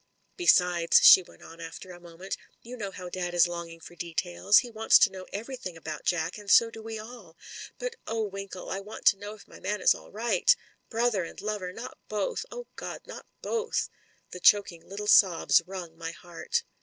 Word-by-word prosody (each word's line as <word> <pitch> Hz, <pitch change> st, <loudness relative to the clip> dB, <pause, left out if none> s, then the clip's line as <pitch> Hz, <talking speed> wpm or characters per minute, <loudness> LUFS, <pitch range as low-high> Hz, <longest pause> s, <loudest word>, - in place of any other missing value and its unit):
"Besides," 180 Hz, -, +4 dB
she -, -, +10 dB
went 180 Hz, -, -17 dB
on 165 Hz, +1 st, -12 dB
after 165 Hz, +3 st, -9 dB
a 175 Hz, -, -11 dB
moment, 175 Hz, +2 st, -7 dB, 0.3 s
"you 245 Hz, +2 st, -8 dB
know 205 Hz, -5 st, -5 dB
how 185 Hz, -2 st, -9 dB
dad 175 Hz, 0 st, -4 dB
is 175 Hz, 0 st, +5 dB
longing 170 Hz, -1 st, -7 dB
for 165 Hz, -, -13 dB
details. 175 Hz, +4 st, +1 dB
He 245 Hz, -, +2 dB
wants 225 Hz, 0 st, +5 dB
to 200 Hz, -, +4 dB
know 185 Hz, -1 st, -9 dB
ever3rthing 220 Hz, -4 st, -6 dB
about 160 Hz, -2 st, -7 dB
Jack, 175 Hz, +2 st, -1 dB
and 205 Hz, -1 st, -10 dB
so 230 Hz, +2 st, +6 dB
do 225 Hz, -, -10 dB
we 225 Hz, 0 st, -6 dB
all. 215 Hz, -7 st, -11 dB, 0.4 s
But -, -, -5 dB
oh. 225 Hz, -1 st, -1 dB
Winkle! 195 Hz, -2 st, -7 dB
I 190 Hz, -, -2 dB
want 205 Hz, +2 st, -10 dB
to -, -, -1 dB
know 205 Hz, +1 st, -7 dB
if 210 Hz, -, -17 dB
my -, -, -14 dB
man 210 Hz, +2 st, -2 dB
is -, -, +5 dB
all -, -, -13 dB
right. 240 Hz, -, +3 dB, 0.3 s
Brother 230 Hz, -4 st, +1 dB
and 165 Hz, -, -9 dB
lover 205 Hz, -4 st, -4 dB
— -, -, -18 dB
^not 245 Hz, +3 st, -7 dB, 0.2 s
both, 215 Hz, -, -2 dB
oh, -, -, -7 dB
God -, -, -7 dB
— -, -, -30 dB
not -, -, -10 dB, 0.2 s
both!" 460 Hz, 0 st, -1 dB, 0.4 s
The 180 Hz, -, -7 dB
choking 180 Hz, -3 st, +4 dB
little 200 Hz, +2 st, -6 dB
sobs 185 Hz, -5 st, +5 dB
wrung 180 Hz, -4 st, -7 dB
my 165 Hz, -1 st, -4 dB
heart. 175 Hz, -, -4 dB
195 Hz, 205 wpm, -28 LUFS, 175-220 Hz, 0.4 s, she